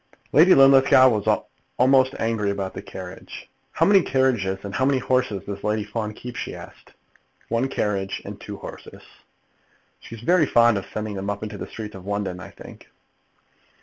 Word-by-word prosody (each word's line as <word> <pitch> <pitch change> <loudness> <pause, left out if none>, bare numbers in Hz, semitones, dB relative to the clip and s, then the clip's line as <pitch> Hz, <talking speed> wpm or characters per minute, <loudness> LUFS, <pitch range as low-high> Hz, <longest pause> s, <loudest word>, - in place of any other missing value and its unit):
Lady 175 +5 +6
Linlithgow 135 -1 +6
was 105 -4 0 0.3
almost 130 +1 +4
angry 115 -2 -1
about 100 -1 -3
the - - -7
carriage. - - -10 0.3
"How - - +2
many 200 -1 +5
carriages 125 - 0
and 100 -1 -7
how 130 - -1
many 135 0 +3
horses 125 -5 -1
does 100 -1 -7
Lady 105 0 0
Fawn 105 0 -5
keep?" 125 +2 -9
she - - -5
asked. - - -14 0.6
"One 115 +3 0
carriage 100 -6 -2
and - - -9
two - - -8
horses." - - -11 1.0
"She's 115 -1 -11
very 170 +3 +3
fond 120 -4 +4
of 95 - -11
sending 110 -1 -4
them 100 0 -4
up 100 +1 -4
into 105 -2 -7
the - - -6
streets 105 -2 -8
of 95 0 -11
London, 100 -3 -3
I 95 - -9
think." - - -14
110 Hz, 175 wpm, -23 LUFS, 100-130 Hz, 1.0 s, Lady